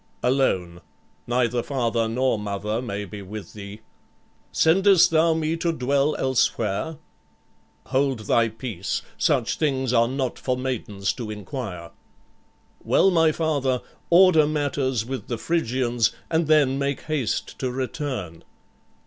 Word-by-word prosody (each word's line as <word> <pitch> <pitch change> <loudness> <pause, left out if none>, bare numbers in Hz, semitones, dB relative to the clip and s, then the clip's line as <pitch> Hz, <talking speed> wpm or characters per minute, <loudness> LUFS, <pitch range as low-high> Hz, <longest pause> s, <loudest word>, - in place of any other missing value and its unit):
"Alone; 95 -10 +1 0.5
neither 120 0 +1
father 115 -4 -1
nor 125 0 0
mother 105 +2 -3
may 105 -4 -4
be 100 +2 -8
with 100 +2 -8
thee." 105 +1 -9 0.7
"Sendest 190 +2 +5
thou 165 0 +4
me 160 0 0
to 170 +1 0
dwell 140 0 +1
elsewhere?" 130 +2 0 0.9
"Hold 135 -3 0
thy 115 +2 +2
peace: 110 -5 -4 0.2
such - - +1
things 130 -5 0
are 115 -1 +4
not 130 0 -3
for 125 -1 -1
maidens 110 -7 -2
to 115 -3 -6
inquire." 105 -5 -6 0.9
"Well, 195 - +4
my 165 -2 +4
father, 145 -6 0 0.3
order 170 -3 +6
matters 140 -5 -1
with 130 +1 -5
the 120 - -3
Phrygians 120 -6 0 0.2
and 160 -1 +1
then 145 -3 +3
make 140 0 -1
haste 150 -8 -2
to 130 - -1
return." 125 - -4
130 Hz, 125 wpm, -24 LUFS, 110-150 Hz, 0.9 s, order